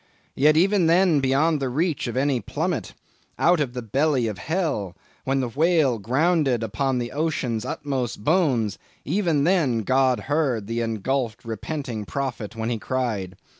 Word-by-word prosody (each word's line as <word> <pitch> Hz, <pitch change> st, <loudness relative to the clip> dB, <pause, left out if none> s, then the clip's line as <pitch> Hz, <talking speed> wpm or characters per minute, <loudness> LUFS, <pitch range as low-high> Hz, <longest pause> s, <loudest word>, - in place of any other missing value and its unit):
Yet 150 Hz, +3 st, +4 dB
even 190 Hz, 0 st, +3 dB
then 170 Hz, -2 st, +4 dB
beyond 140 Hz, +4 st, +2 dB
the 135 Hz, -2 st, -1 dB
reach 155 Hz, +2 st, -1 dB
of 120 Hz, -, -4 dB
any 135 Hz, -1 st, +1 dB
plummet—'out 170 Hz, -, -2 dB
of 135 Hz, -5 st, -1 dB
the 125 Hz, -, -4 dB
belly 135 Hz, +2 st, +1 dB
of 105 Hz, -3 st, -4 dB
hell'—when 135 Hz, -, -3 dB
the 125 Hz, -, -2 dB
whale 150 Hz, -3 st, +2 dB
grounded 135 Hz, -, +1 dB
upon 125 Hz, +5 st, -1 dB
the 120 Hz, -1 st, -3 dB
ocean's 135 Hz, -7 st, -1 dB
utmost 130 Hz, -6 st, -3 dB
bones, 130 Hz, -, +1 dB, 0.3 s
even 170 Hz, -8 st, +1 dB
then, 145 Hz, -, +2 dB
God 130 Hz, +2 st, +2 dB
heard 135 Hz, -7 st, 0 dB
the 115 Hz, +2 st, -2 dB
engulphed, 115 Hz, 0 st, -2 dB
repenting 115 Hz, 0 st, -4 dB
prophet 125 Hz, -4 st, -4 dB
when 115 Hz, +1 st, -2 dB
he 115 Hz, -, -2 dB
cried. 105 Hz, -7 st, -2 dB
130 Hz, 145 wpm, -24 LUFS, 115-155 Hz, 0.3 s, Yet